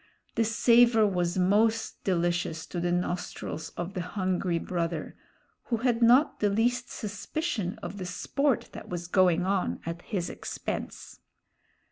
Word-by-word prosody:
The 225 Hz, -, +2 dB
savor 230 Hz, 0 st, +5 dB
was 180 Hz, -3 st, 0 dB
most 215 Hz, +5 st, +2 dB
delicious 175 Hz, -3 st, 0 dB
to 175 Hz, -, -5 dB
the 175 Hz, 0 st, 0 dB
nostrils 175 Hz, -2 st, -3 dB
of 175 Hz, +3 st, -4 dB
the 185 Hz, -, -2 dB
hungry 185 Hz, -1 st, -1 dB
brother, 170 Hz, -2 st, -3 dB, 0.5 s
who 235 Hz, -, 0 dB
had 240 Hz, 0 st, +1 dB
not 250 Hz, +6 st, +5 dB
the 205 Hz, -, +2 dB
least 245 Hz, +4 st, +1 dB
suspicion 210 Hz, -, -3 dB
of 200 Hz, -, -6 dB
the 185 Hz, -, -4 dB
sport 275 Hz, -, 0 dB
that -, -, -10 dB
was 175 Hz, -1 st, -4 dB
going 180 Hz, -1 st, +3 dB
on 190 Hz, -1 st, 0 dB
at 170 Hz, +1 st, -4 dB
his 180 Hz, -4 st, -3 dB
expense. -, -, -6 dB
190 Hz, 140 wpm, -28 LUFS, 175-225 Hz, 0.5 s, savor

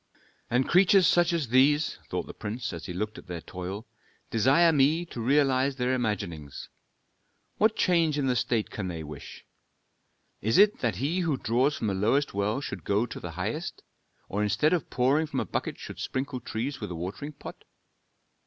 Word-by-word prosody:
"And 125 Hz, +2 st, +2 dB
creatures 185 Hz, +1 st, +5 dB
such 175 Hz, 0 st, +4 dB
as 160 Hz, -8 st, -1 dB
these," 145 Hz, +5 st, +3 dB
thought -, -, -2 dB
the -, -, -9 dB
prince, 115 Hz, +1 st, -5 dB
as 85 Hz, -, -7 dB
he -, -, -5 dB
looked 105 Hz, +4 st, -4 dB
at -, -, -16 dB
their 90 Hz, -1 st, -5 dB
toil, 90 Hz, +6 st, -6 dB, 0.5 s
"desire 135 Hz, +9 st, +4 dB
me 150 Hz, +4 st, +3 dB
to 125 Hz, -8 st, -7 dB
realize 135 Hz, +1 st, +2 dB
their 125 Hz, 0 st, 0 dB
imaginings. 100 Hz, -, -3 dB, 0.9 s
What 220 Hz, +1 st, +3 dB
change 165 Hz, -5 st, +2 dB
in 140 Hz, -, 0 dB
the 130 Hz, -1 st, +1 dB
state 115 Hz, -2 st, 0 dB
can 100 Hz, -3 st, -4 dB
they 85 Hz, -3 st, -5 dB
wish? 75 Hz, -1 st, -10 dB, 1.0 s
Is 110 Hz, +2 st, +2 dB
it 210 Hz, +1 st, +5 dB
that 115 Hz, -6 st, 0 dB
he 145 Hz, -, -1 dB
who 165 Hz, -6 st, 0 dB
draws 130 Hz, +5 st, +1 dB
from -, -, -3 dB
the 100 Hz, -, 0 dB
lowest 115 Hz, +9 st, +1 dB
well 105 Hz, +6 st, 0 dB
should 95 Hz, -, -6 dB
go 100 Hz, +6 st, +1 dB
to -, -, -8 dB
the -, -, -7 dB
highest, -, -, -4 dB, 0.4 s
or 105 Hz, -, -2 dB
instead 150 Hz, -, +2 dB
of 175 Hz, -, -1 dB
pouring 140 Hz, +6 st, +2 dB
from 140 Hz, -3 st, -2 dB
a -, -, -1 dB
bucket -, -, -3 dB
should -, -, -9 dB
sprinkle 130 Hz, 0 st, -3 dB
trees 120 Hz, +4 st, -4 dB
with 105 Hz, -, -4 dB
a 90 Hz, -, -5 dB
watering 95 Hz, -, -5 dB
pot?" 140 Hz, -, -10 dB
130 Hz, 185 wpm, -28 LUFS, 105-150 Hz, 1.0 s, creatures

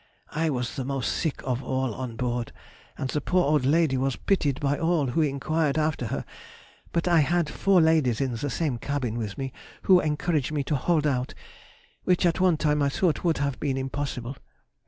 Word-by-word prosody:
I 160 Hz, +1 st, 0 dB
was 125 Hz, -1 st, -3 dB
the 135 Hz, -, -1 dB
most 135 Hz, -1 st, -2 dB
sick 160 Hz, -5 st, -2 dB
of 125 Hz, -1 st, -1 dB
all 130 Hz, -2 st, -1 dB
on 125 Hz, 0 st, -5 dB
board, 120 Hz, -1 st, -2 dB, 0.5 s
and 135 Hz, -, -2 dB
the 150 Hz, -, -1 dB
poor 180 Hz, 0 st, +2 dB
old 145 Hz, -3 st, +2 dB
lady 155 Hz, -2 st, +3 dB
was 135 Hz, 0 st, 0 dB
pitied 145 Hz, -9 st, 0 dB
by 145 Hz, 0 st, 0 dB
all 165 Hz, -3 st, +2 dB
who 140 Hz, +7 st, +1 dB
enquired 150 Hz, +1 st, 0 dB
after 155 Hz, -5 st, 0 dB
her, -, -, -3 dB, 0.7 s
but 170 Hz, +1 st, 0 dB
I 170 Hz, -2 st, +5 dB
had 165 Hz, +3 st, +2 dB
four 190 Hz, +5 st, +3 dB
ladies 155 Hz, -8 st, +3 dB
in 135 Hz, -2 st, 0 dB
the 145 Hz, +6 st, -3 dB
same 140 Hz, -5 st, -1 dB
cabin 130 Hz, -5 st, -2 dB
with 110 Hz, -4 st, -4 dB
me, 135 Hz, -1 st, -4 dB, 0.3 s
who 185 Hz, -2 st, +6 dB
encouraged 155 Hz, -2 st, 0 dB
me 145 Hz, -2 st, -1 dB
to 150 Hz, -, -1 dB
hold 155 Hz, +2 st, +1 dB
out, 130 Hz, -3 st, -1 dB, 0.7 s
which 180 Hz, 0 st, +2 dB
at 170 Hz, 0 st, +2 dB
one 180 Hz, -3 st, +4 dB
time 150 Hz, -1 st, +1 dB
I 140 Hz, -, +3 dB
thought 165 Hz, +3 st, 0 dB
would 170 Hz, -2 st, +2 dB
have 140 Hz, -2 st, -2 dB
been 135 Hz, -3 st, -1 dB
impossible. 135 Hz, -1 st, -4 dB
145 Hz, 200 wpm, -26 LUFS, 130-160 Hz, 0.7 s, who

